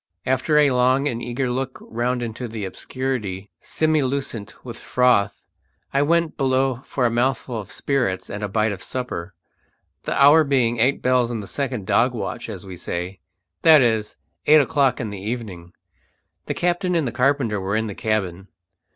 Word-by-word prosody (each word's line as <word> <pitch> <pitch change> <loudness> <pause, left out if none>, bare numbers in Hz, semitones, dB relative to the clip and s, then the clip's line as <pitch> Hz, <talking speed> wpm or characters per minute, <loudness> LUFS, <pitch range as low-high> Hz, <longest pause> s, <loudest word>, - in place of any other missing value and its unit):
After 130 +4 +2
a 145 -2 +5
long 130 +3 +3
and 120 -4 -3
eager 125 +2 -2
look 130 +1 -3
round 120 +2 -2
into 120 +2 -5
the 110 -3 -5
obscurity, 105 -2 -4
semi 155 -1 +1
lucent 130 -6 -4
with 120 -2 -8
froth, 125 -5 +2 0.5
I 140 - +3
went 165 +2 +1
below 130 -2 +1
for 130 - -1
a 120 - +2
mouthful 120 0 0
of 100 - -9
spirits 125 -10 -1
and 105 +1 -6
a - - 0
bite 110 +2 +1
of 95 -2 -6
supper, 95 -9 -5 0.7
the - - -1
hour 145 +3 +7
being 125 -5 +1
eight 130 +5 +2
bells 125 -1 +3
in 120 -2 -3
the 105 - -6
second 125 -2 -3
dog 120 +5 +2
watch 115 +1 -5
as 100 -3 -7
we 95 -2 -8
say, 90 +3 -5 0.4
that 155 -4 +7
is, 110 -3 0 0.3
eight 155 +1 +8
o'clock 135 -2 +2
in 110 -4 -4
the 100 -2 -7
evening. 100 -6 -5 0.8
The - - -2
captain 175 +1 0
and 140 -9 0
carpenter 125 -5 +1
were 95 +2 -1
in 110 0 0
the 105 - -5
cabin. 95 -4 -2
125 Hz, 175 wpm, -22 LUFS, 105-135 Hz, 0.8 s, eight